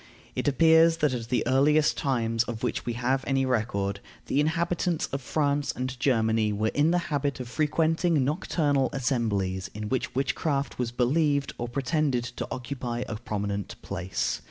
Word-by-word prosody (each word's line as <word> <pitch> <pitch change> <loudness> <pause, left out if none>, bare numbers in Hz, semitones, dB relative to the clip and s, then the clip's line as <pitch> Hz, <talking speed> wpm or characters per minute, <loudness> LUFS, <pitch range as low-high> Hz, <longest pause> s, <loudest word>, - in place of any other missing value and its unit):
It - - -2
appears 160 +3 +5
that, 150 -4 +1
at 115 -2 -4
the 125 - +1
earliest 145 +4 +3
times 115 -4 0
of 115 -2 -6
which - - -2
we 120 - 0
have 130 +3 0
any 135 -1 +2
record, 100 -5 -1 0.3
the 140 - 0
inhabitants 170 +2 0
of 140 - -2
France 145 +1 0
and 130 0 -4
Germany 110 -4 +2
were 110 +2 0
in 145 +2 +3
the 175 - +3 0.2
habit 140 -1 -1
of 125 - -5
frequenting 160 +2 +1
nocturnal 145 -3 +1
assemblies 105 -8 -1
in 105 0 -4
which 130 -2 -2
witchcraft 140 +1 -1
was 125 -2 0
believed 140 +3 +1
or 120 - -2
pretended 140 0 0
to 125 0 -5
occupy 125 -2 -4
a 110 - -4
prominent 100 -3 -4
place. 95 +2 -2
130 Hz, 160 wpm, -27 LUFS, 115-145 Hz, 0.3 s, appears